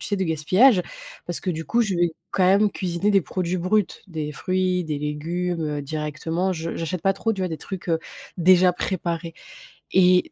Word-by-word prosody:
tu -, -, -5 dB
sais? 205 Hz, -, -1 dB
De 190 Hz, -, 0 dB
gaspillage, 180 Hz, -, +4 dB, 0.4 s
parce 175 Hz, -, -4 dB
que, 185 Hz, -, -2 dB
du 160 Hz, -1 st, -4 dB
coup, 235 Hz, 0 st, +2 dB
je 200 Hz, -4 st, -1 dB
vais 175 Hz, -1 st, +2 dB, 0.2 s
quand 185 Hz, -, +2 dB
même 200 Hz, +3 st, +4 dB
cuisiner 185 Hz, +2 st, -1 dB
des 195 Hz, -, +5 dB
produits 180 Hz, +1 st, -2 dB
bruts, 190 Hz, +3 st, +2 dB, 0.2 s
des 155 Hz, -3 st, -4 dB
fruits, 185 Hz, +3 st, 0 dB
des 150 Hz, -2 st, -3 dB
légumes, 165 Hz, +4 st, -2 dB
heu, 150 Hz, -1 st, -2 dB
directement, 155 Hz, +5 st, -2 dB
je 165 Hz, -1 st, -4 dB
j'achète 165 Hz, +1 st, -3 dB
pas 195 Hz, -, +3 dB
trop, 225 Hz, +3 st, -1 dB
tu 200 Hz, -, -5 dB
vois? 185 Hz, -, 0 dB
Des 160 Hz, -2 st, -5 dB
trucs, 185 Hz, +2 st, -7 dB
heu, 165 Hz, -, +2 dB, 0.4 s
déjà 180 Hz, +1 st, +6 dB
préparés 170 Hz, -2 st, -3 dB, 0.6 s
et, 180 Hz, -1 st, +4 dB
180 Hz, 200 wpm, -23 LUFS, 160-185 Hz, 0.6 s, déjà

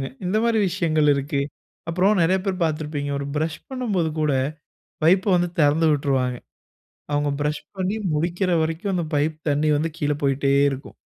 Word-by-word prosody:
ஆமாங்க. 135 Hz, -, -2 dB, 0.2 s
இந்த 185 Hz, +4 st, 0 dB
மாரி 230 Hz, -1 st, +2 dB
விஷயங்களிருக்கு 150 Hz, -5 st, +1 dB, 0.5 s
அப்பறம் 185 Hz, +4 st, +2 dB
நெறைய 185 Hz, +3 st, +3 dB
பேர் 190 Hz, -2 st, -2 dB
பாத்திருப்பீங்க. 150 Hz, -2 st, -2 dB
ஒரு 140 Hz, -, -4 dB
பிரஷ் 155 Hz, 0 st, -1 dB
பண்ணும்போது 215 Hz, -11 st, -1 dB
கூட, 150 Hz, -1 st, +2 dB, 0.7 s
பைப்ப 185 Hz, +4 st, +4 dB
வந்து 175 Hz, 0 st, +1 dB
திறந்து 155 Hz, +2 st, +4 dB
விட்டுருவாங்க. 135 Hz, -4 st, 0 dB, 0.8 s
அவுங்க 145 Hz, 0 st, +1 dB
பிரஷ் 150 Hz, 0 st, -1 dB, 0.2 s
பண்ணி 190 Hz, +3 st, -1 dB, 0.2 s
முடிக்கிற 175 Hz, +4 st, 0 dB
வரைக்கும், 165 Hz, +5 st, -2 dB
அந்த 175 Hz, -2 st, 0 dB
பைப் 150 Hz, +2 st, 0 dB
தண்ணீ 145 Hz, +2 st, +1 dB
வந்து 160 Hz, +2 st, 0 dB
கீழ 150 Hz, -2 st, 0 dB
போய்ட்டே 135 Hz, 0 st, +1 dB, 0.2 s
இருக்கும். 135 Hz, +1 st, -7 dB
155 Hz, 150 wpm, -23 LUFS, 145-180 Hz, 0.8 s, பைப்ப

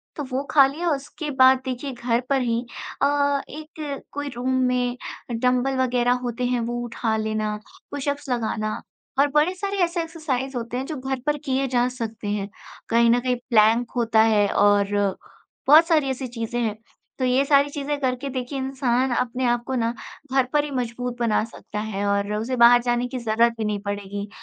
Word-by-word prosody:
तो 295 Hz, -, -4 dB
वो 265 Hz, +2 st, -1 dB
खा 280 Hz, -3 st, +7 dB
लिया, 335 Hz, +5 st, -2 dB
उसके 295 Hz, +2 st, -4 dB
बाद 260 Hz, 0 st, +7 dB
देखिए 260 Hz, +2 st, -4 dB
घर 240 Hz, -1 st, 0 dB
पर 275 Hz, -1 st, +2 dB
ही 235 Hz, -1 st, 0 dB, 0.4 s
अ, 285 Hz, 0 st, +2 dB
एक 305 Hz, -1 st, -7 dB
कोई 290 Hz, 0 st, -4 dB
रूम 250 Hz, +2 st, -2 dB, 0.2 s
में 250 Hz, 0 st, 0 dB, 0.3 s
डंबल 250 Hz, +3 st, +1 dB
वग़ैरह 245 Hz, -1 st, +2 dB
होते 245 Hz, 0 st, -3 dB
हैं, 245 Hz, -1 st, +1 dB
वो 240 Hz, +1 st, -2 dB
उठा 230 Hz, -1 st, -2 dB
लेना, 215 Hz, -1 st, -1 dB, 0.4 s
पुश-अप्स 285 Hz, 0 st, -3 dB
लगाना 220 Hz, -3 st, -2 dB, 0.4 s
और 285 Hz, -, +5 dB
बड़े 305 Hz, +5 st, +3 dB
सारे 400 Hz, +1 st, -3 dB
ऐसे 340 Hz, 0 st, 0 dB
एक्सरसाइज़ 275 Hz, -6 st, -3 dB
होते 235 Hz, +1 st, -4 dB
हैं 265 Hz, -, -3 dB
जो 310 Hz, -, -5 dB
घर 265 Hz, 0 st, -3 dB
पर 295 Hz, 0 st, +1 dB
किए 270 Hz, 0 st, 0 dB
जा 245 Hz, -1 st, +2 dB
सकते 225 Hz, -4 st, -6 dB
हैं, 205 Hz, -1 st, -2 dB, 0.4 s
कहीं 235 Hz, 0 st, +4 dB
न 240 Hz, -, +4 dB
कहीं 250 Hz, 0 st, 0 dB
प्लैंक 225 Hz, +1 st, +4 dB
होता 225 Hz, -2 st, +3 dB
है 215 Hz, -2 st, +4 dB
और 205 Hz, -1 st, +4 dB, 0.8 s
बहुत 315 Hz, +3 st, +8 dB
सारी 305 Hz, -5 st, +2 dB
ऐसी 260 Hz, 0 st, -3 dB
चीज़ें 235 Hz, 0 st, -4 dB
हैं। 215 Hz, -2 st, -1 dB, 0.4 s
तो 260 Hz, -, +1 dB
ये 255 Hz, +2 st, +3 dB
सारी 280 Hz, 0 st, +4 dB
चीज़ें 285 Hz, 0 st, -3 dB
करके 260 Hz, 0 st, -1 dB
देखिए 255 Hz, +1 st, -4 dB
इंसान 260 Hz, -1 st, 0 dB
अपने 250 Hz, +1 st, -1 dB
आप 240 Hz, 0 st, +1 dB
को 265 Hz, -, -2 dB
ना 230 Hz, -1 st, 0 dB, 0.4 s
घर 265 Hz, -1 st, +4 dB
पर 295 Hz, -1 st, +3 dB
ही 295 Hz, -, -5 dB
मज़बूत 245 Hz, -1 st, -3 dB
बना 230 Hz, -2 st, +2 dB
सकता 220 Hz, -2 st, -8 dB
है 205 Hz, -2 st, -3 dB
और 200 Hz, +1 st, 0 dB
उसे 245 Hz, +4 st, -2 dB
बाहर 240 Hz, 0 st, +7 dB
जाने 240 Hz, 0 st, 0 dB
की 255 Hz, +1 st, -5 dB
ज़रूरत 230 Hz, 0 st, +2 dB
भी 220 Hz, -, -2 dB
नहीं 210 Hz, -1 st, -1 dB
पड़ेगी, 200 Hz, 0 st, -4 dB
250 Hz, 190 wpm, -23 LUFS, 230-275 Hz, 0.8 s, बहुत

